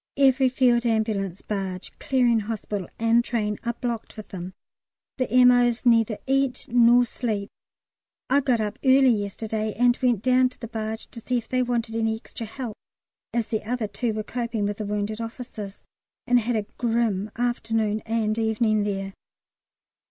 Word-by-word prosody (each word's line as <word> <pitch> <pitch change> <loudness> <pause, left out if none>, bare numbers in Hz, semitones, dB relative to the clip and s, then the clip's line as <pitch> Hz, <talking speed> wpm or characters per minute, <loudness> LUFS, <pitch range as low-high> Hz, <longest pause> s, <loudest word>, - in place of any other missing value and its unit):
Every 265 -1 +4
Field 245 -2 +3
Ambulance, 215 -5 -1
barge, 195 -3 -4
Clearing 245 -4 +2
Hospital, 205 -3 -4
and 230 +1 +3
train 210 -4 -2
are 235 -1 -2
blocked 235 -2 -4
with 215 - -9
them. 185 0 -7 0.6
The 255 - 0
M.O.'s 245 0 +4
neither 230 -3 +4
eat 270 -1 0
nor 240 0 +6
sleep. 215 -4 -3 0.8
I 275 +2 +4
got 255 -4 +1
up 210 -1 -3
early 265 -1 +6
yesterday 215 0 -2
and 245 0 +4
went 240 -5 +2
down 255 0 +4
to 250 - -19
the 230 - -6
barge 220 -1 -5
to 230 - -9
see 250 +2 0
if 230 - -5
they 255 0 +1
wanted 240 -2 -1
any 225 -1 +1
extra 225 0 -8
help 235 -1 -6 0.5
(as 235 -2 -1
the 220 - -1
other 235 +1 -2
two 225 +2 -2
were 215 0 -3
coping 235 -2 -2
with 205 0 -2
the 215 - -4
wounded 210 +2 -2
officers), 225 -4 -7 0.4
and 245 0 +4
had 235 +1 -1
a 215 -2 -1
grim 225 -4 0
afternoon 225 -3 0
and 225 -1 0
evening 220 -1 +1
there. 195 -1 -3
230 Hz, 165 wpm, -25 LUFS, 215-245 Hz, 0.8 s, nor